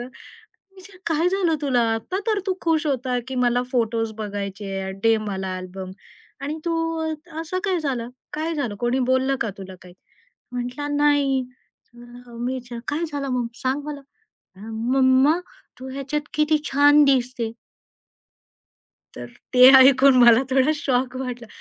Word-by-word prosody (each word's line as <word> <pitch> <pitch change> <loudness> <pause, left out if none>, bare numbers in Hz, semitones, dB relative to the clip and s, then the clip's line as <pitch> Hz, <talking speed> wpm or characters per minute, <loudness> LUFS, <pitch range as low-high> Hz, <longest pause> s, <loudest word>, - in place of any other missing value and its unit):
मी 245 - -7 0.7
विचारलं 375 0 -15
"काय 325 +2 +2
झालं 365 -3 +1
तुला 255 -4 +2
आता 225 +12 -4
तर 435 -2 +1
तू 380 - 0
खुश 320 -2 +1
होता 255 -3 -1
की 265 - -5
मला 245 0 +2
फोटोज 225 -2 0
बघायचे. 200 -2 -5
दे 225 0 +4
मला 190 -2 -3
अल्बम 185 0 -8 0.5
आणि 295 +3 -4
तू 335 -1 0 0.7
असं 330 +3 -3
काय 380 -3 +1
झालं. 255 -6 -3 0.2
काय 315 +2 -3
झालं 275 -9 -3
कोणी 240 +2 0
बोललं 260 +1 +2
का 225 - -1
तुला 190 -1 -9
काही?" 180 0 -15 0.6
म्हटलं 250 +4 -4
"नाही." 285 -2 +2 0.5
मी 240 +1 -7
विचारलं 245 -2 -7
"काय 315 +4 -1
झालं 280 -1 -3
मग 250 -2 -1 0.2
सांग 265 +3 -1
मला." 295 -1 -6 0.7
"मम्मा 260 +6 +3 0.4
तू 260 +1 -8
ह्याच्यात 275 +2 -3
किती 305 0 +2
छान 290 +2 +6
दिसते." 250 -4 0 1.6
तर - - -7 0.3
ते 250 0 +9
ऐकून 265 0 +6
मला 235 +1 +7
थोडा 265 +2 +3
शॉक 255 -3 -1
वाटला, 250 -2 -5
260 Hz, 140 wpm, -23 LUFS, 235-290 Hz, 1.6 s, ते